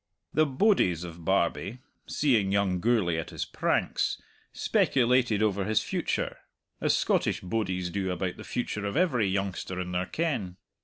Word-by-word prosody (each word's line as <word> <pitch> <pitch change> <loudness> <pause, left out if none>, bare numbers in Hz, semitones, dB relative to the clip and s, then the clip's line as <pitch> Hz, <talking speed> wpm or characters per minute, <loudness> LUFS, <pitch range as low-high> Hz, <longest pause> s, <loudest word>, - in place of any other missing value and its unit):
The 155 0 +4
bodies 130 - +2
of 85 -1 -9
Barbie, 95 +5 0 0.3
seeing 115 -10 +2
young 100 -2 +1
Gourlay 100 -6 +2
at 80 - -5
his - - -4
pranks, - - 0 0.3
speculated 125 -4 +2
over 100 -2 +1
his 110 +1 +2
future, - - -2 0.4
as - - +3
Scottish - - +1
bodies 90 -3 -2
do 95 0 -2
about 90 0 -2
the - - -8
future 105 -4 -3
of 100 - -2
every 130 - +2
youngster 95 -1 -2
in 90 -1 -4
their 90 0 -1
ken. 130 - -2
100 Hz, 150 wpm, -28 LUFS, 90-120 Hz, 0.4 s, The